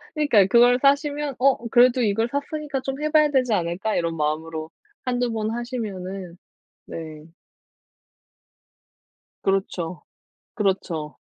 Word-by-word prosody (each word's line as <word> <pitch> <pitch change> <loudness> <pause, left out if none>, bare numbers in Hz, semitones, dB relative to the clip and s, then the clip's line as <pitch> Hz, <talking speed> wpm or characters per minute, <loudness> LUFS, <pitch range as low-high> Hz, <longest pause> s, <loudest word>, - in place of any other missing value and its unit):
그니까요. 235 -11 +4
그걸 245 +2 +5
사시면 285 0 +1
'어 260 -3 +2
그래도 245 +1 +5
이걸 225 +1 +1
샀으니까 285 -1 -3
좀 270 +2 -5
해 305 0 -1
봐야 305 -1 +5
되지 255 -4 +2
않을까?' 180 +4 -1
이런 165 -1 -1
마음으로 155 +1 -3 0.3
1-2 245 -1 0
번 220 0 -2
하시면은 195 -7 -5 0.5
네. 155 -2 -8 2.2
그렇죠. 185 -3 -1 0.5
그렇죠. 180 -7 -2
225 Hz, 245 characters per minute, -23 LUFS, 180-265 Hz, 2.2 s, 그걸